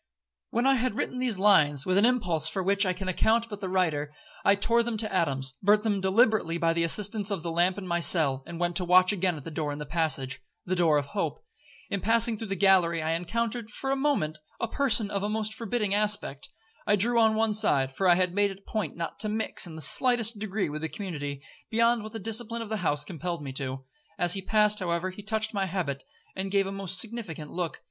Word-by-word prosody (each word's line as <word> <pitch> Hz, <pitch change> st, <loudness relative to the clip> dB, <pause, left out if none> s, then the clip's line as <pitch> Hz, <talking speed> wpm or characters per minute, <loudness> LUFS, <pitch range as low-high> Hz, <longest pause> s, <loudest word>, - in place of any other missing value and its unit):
'When 235 Hz, +3 st, -1 dB
I 270 Hz, -, +5 dB
had 250 Hz, -2 st, -1 dB
written 250 Hz, -, -3 dB
these 250 Hz, -5 st, 0 dB
lines, 150 Hz, -8 st, +4 dB
with 185 Hz, -, 0 dB
an 205 Hz, +4 st, +5 dB
impulse 180 Hz, -11 st, +3 dB
for 190 Hz, +3 st, -2 dB
which 200 Hz, +1 st, +2 dB
all 185 Hz, -, +1 dB
can 190 Hz, +1 st, -6 dB
account 225 Hz, +5 st, +1 dB
but 205 Hz, -2 st, -7 dB
the 190 Hz, -2 st, -4 dB
writer, 160 Hz, -6 st, 0 dB, 0.3 s
I 200 Hz, -, +4 dB
tore 230 Hz, +4 st, +2 dB
them 235 Hz, -1 st, -3 dB
to 215 Hz, -2 st, -2 dB
atoms, 135 Hz, -7 st, 0 dB
burnt 210 Hz, +2 st, +3 dB
them 205 Hz, -3 st, 0 dB
deliberately 190 Hz, -3 st, +2 dB
by 165 Hz, -1 st, +1 dB
the 170 Hz, -, -1 dB
assistance 205 Hz, +5 st, +2 dB
of 195 Hz, -6 st, -3 dB
the 170 Hz, -, -3 dB
lamp 175 Hz, +3 st, +1 dB
in 200 Hz, -, -6 dB
my 170 Hz, -1 st, -1 dB
cell, 150 Hz, -6 st, +3 dB
and 170 Hz, -1 st, -8 dB
went 175 Hz, 0 st, -1 dB
to 185 Hz, -, +1 dB
watch 185 Hz, +2 st, +5 dB
again 185 Hz, -3 st, -1 dB
at 145 Hz, -, -10 dB
the 165 Hz, -, -8 dB
door 150 Hz, -1 st, -3 dB
in 145 Hz, -, -5 dB
the 150 Hz, -, -6 dB
passage—the 155 Hz, +2 st, -3 dB
door 165 Hz, -4 st, +3 dB
of 145 Hz, -, -1 dB
hope. 200 Hz, -, -4 dB, 0.5 s
In 200 Hz, -, -2 dB
passing 230 Hz, +1 st, +3 dB
through 220 Hz, +1 st, -6 dB
the 195 Hz, -, -3 dB
gallery, 180 Hz, -4 st, +3 dB
I 160 Hz, -, -1 dB
encountered, 225 Hz, +7 st, -3 dB
for 270 Hz, +5 st, -4 dB
a -, -, +2 dB
moment, 270 Hz, -, -1 dB, 0.2 s
a 230 Hz, -, -1 dB
person 225 Hz, -5 st, +3 dB
of 200 Hz, -, -2 dB
a 205 Hz, -, -2 dB
most 215 Hz, 0 st, -2 dB
forbidding 220 Hz, -3 st, -2 dB
aspect. 205 Hz, -9 st, 0 dB, 0.4 s
I 205 Hz, -, +4 dB
drew 235 Hz, +4 st, +2 dB
on 220 Hz, -1 st, +4 dB
one 220 Hz, 0 st, +1 dB
side—for 180 Hz, -4 st, +2 dB
I 175 Hz, -, +6 dB
had 180 Hz, -1 st, 0 dB
made 205 Hz, +1 st, +2 dB
it 195 Hz, 0 st, -11 dB
a -, -, -14 dB
point 210 Hz, -9 st, -3 dB
not 165 Hz, -1 st, -5 dB
to 215 Hz, -, +1 dB
mix, 215 Hz, -3 st, -1 dB
in 160 Hz, -, -10 dB
the 160 Hz, -, -7 dB
slightest 235 Hz, +1 st, +2 dB
degree, 215 Hz, -1 st, -2 dB
with 150 Hz, 0 st, -6 dB
the 160 Hz, -, -3 dB
community, 145 Hz, -9 st, -6 dB, 0.3 s
beyond 230 Hz, +1 st, +2 dB
what 215 Hz, +1 st, -9 dB
the -, -, -4 dB
discipline 230 Hz, +2 st, -1 dB
of 220 Hz, -, -10 dB
the 220 Hz, -, -2 dB
house 145 Hz, -6 st, 0 dB
compelled 170 Hz, 0 st, -5 dB
me 135 Hz, -2 st, -6 dB
to. 130 Hz, 0 st, -5 dB, 0.3 s
As 175 Hz, 0 st, +3 dB
he 195 Hz, -, -1 dB
passed, 210 Hz, +1 st, +2 dB
however, 175 Hz, 0 st, -2 dB
he 185 Hz, -, -10 dB
touched 215 Hz, +1 st, -1 dB
my 195 Hz, -2 st, -1 dB
habit, 155 Hz, -8 st, -3 dB, 0.3 s
and 195 Hz, +1 st, -3 dB
gave 195 Hz, 0 st, +2 dB
a 195 Hz, -, -5 dB
most 195 Hz, -2 st, -3 dB
significant 185 Hz, -9 st, -6 dB
look. 175 Hz, -3 st, -4 dB
195 Hz, 235 wpm, -27 LUFS, 165-215 Hz, 0.5 s, I